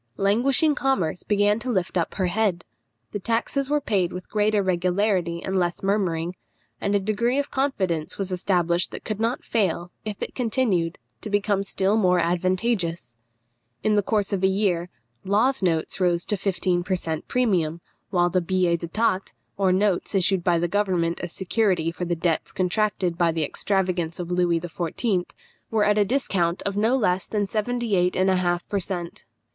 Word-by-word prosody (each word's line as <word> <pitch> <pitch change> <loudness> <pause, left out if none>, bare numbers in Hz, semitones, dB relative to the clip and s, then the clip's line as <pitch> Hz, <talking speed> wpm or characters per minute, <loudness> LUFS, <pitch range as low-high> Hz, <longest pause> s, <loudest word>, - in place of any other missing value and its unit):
Languishing 255 +10 +3
commerce 265 - 0
began 205 +1 +2
to 255 - -5
lift 190 -7 -1
up 170 -2 -1
her 190 - 0
head; 180 -2 0 0.5
the 205 - -3
taxes 235 +6 -1
were 295 0 +2
paid 195 -10 0
with 180 0 -8
greater 210 -1 +2
regularity 180 -1 0
and 190 - -2
less 175 0 -1
murmuring; 180 -4 0 0.5
and 200 0 +1
a - - +4
degree 215 +6 0
of 285 0 -1
confidence 190 - -1
was 195 -1 -3
established 175 -2 +1
that - - -8
could 215 -1 -4
not 230 +3 -1
fail, 180 -5 0
if 210 -2 -5
it - - -4
continued, 220 -9 0 0.2
to 215 - -6
become 205 -1 +1
still 195 +1 0
more 180 -4 +3
advantageous. 175 - 0 0.7
In 215 - +2
the 205 - +4
course 205 0 0
of 190 - 0
a - - +6
year, 190 -3 0 0.3
Law's 220 +7 +2
notes 165 -1 0
rose 175 -1 +2
to 210 - -1
fifteen 185 -2 0
per 185 +1 0
cent 160 -3 -4
premium, 180 -10 +1 0.3
while 175 -2 +2
the 185 +1 +2
billets 175 -1 +1
d'état, 190 +2 0 0.2
or 195 -2 +2
notes 195 +1 +1
issued 190 -1 +2
by 175 -1 +3
the 175 +1 +1
government 175 -3 0
as 175 - -5
security 190 -4 0
for 180 +1 -4
the 175 0 -1
debts 165 -1 -1
contracted 185 -2 0
by 170 -1 +4
the 160 -1 -1
extravagant 180 0 -1
Louis 175 -1 +1
XIV., 175 +3 -2 0.4
were 220 -2 +2
at 210 0 +3
a 205 - +4
discount 190 -8 0
of 200 - -2
no 220 +5 +2
less 185 -6 +1
than 210 -2 0
seventy 225 +2 -1
eight 180 0 +2
and 190 +1 +3
a 185 - +2
half 175 -1 0
per 200 - -1
cent. 175 -2 -5
190 Hz, 175 wpm, -24 LUFS, 175-210 Hz, 0.7 s, a